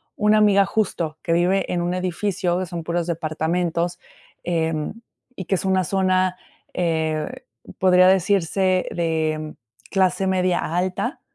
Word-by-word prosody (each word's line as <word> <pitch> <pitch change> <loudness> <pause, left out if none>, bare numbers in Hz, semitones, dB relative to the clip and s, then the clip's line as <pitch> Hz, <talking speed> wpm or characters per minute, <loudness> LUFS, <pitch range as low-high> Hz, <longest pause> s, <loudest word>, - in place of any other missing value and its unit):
Una 210 0 +3
amiga, 200 -2 +5
justo, 170 -8 -2
que 165 - 0
vive 185 +3 +1
en 175 -1 0
un 175 +1 -1
edificio 185 0 -1
que 185 - -2
son 170 -2 -6
puros 170 0 -1
departamentos, 170 +2 -1 0.4
em, 160 -1 -1 0.4
y 190 - -6
que 190 - -2
es 190 - -3
una 190 -1 +2
zona, 185 0 +1 0.4
eh, 160 -3 -2 0.3
podría 185 0 +5
decirse 190 0 +2
de 155 -2 -2 0.4
clase 190 0 +2
media 185 -1 +1 0.2
alta. 185 - -2
180 Hz, 130 wpm, -22 LUFS, 165-190 Hz, 0.4 s, amiga